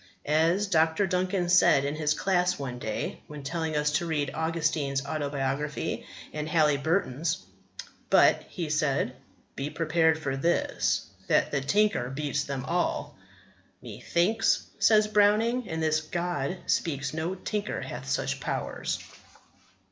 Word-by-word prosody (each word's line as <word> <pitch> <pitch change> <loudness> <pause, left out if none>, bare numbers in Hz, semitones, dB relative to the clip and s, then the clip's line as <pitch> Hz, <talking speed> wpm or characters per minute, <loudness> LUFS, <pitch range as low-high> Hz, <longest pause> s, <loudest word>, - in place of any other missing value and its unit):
As 165 +6 +2
Dr. 165 0 +2
Duncan 185 0 0
said 175 -6 +5
in 140 - -1
his 155 0 +1
class 180 0 +1
one 125 -3 -5
day 110 -3 -4
when 150 -1 -9
telling 160 +1 -2
us 150 0 +1
to 170 +3 0
read 145 -4 -1
Augustine's 155 -4 -1
Autobiography 140 0 -2 0.3
and 150 0 -4
Halyburton's: 155 +1 +1 0.7
"But," - - +5
he 170 -4 -4
said, 145 -4 0 0.4
"be 140 +2 -3
prepared 160 0 +2
for 140 -4 -3
this, 170 +6 0 0.2
that - - +2
the 140 - 0
tinker 200 - +2
beats 145 +1 -2
them 135 -2 -4
all!" 175 +3 -1 0.7
"Methinks," 215 +7 +1 0.2
says 215 -1 +5
Browning, 215 +3 +3
"in 160 -2 -3
this 155 0 +2
God 170 -1 -2
speaks, 140 -4 -1
no 165 +4 -2
tinker 210 +2 -3
hath - - -6
such - - -1
powers." - - -3
160 Hz, 130 wpm, -28 LUFS, 145-180 Hz, 0.7 s, said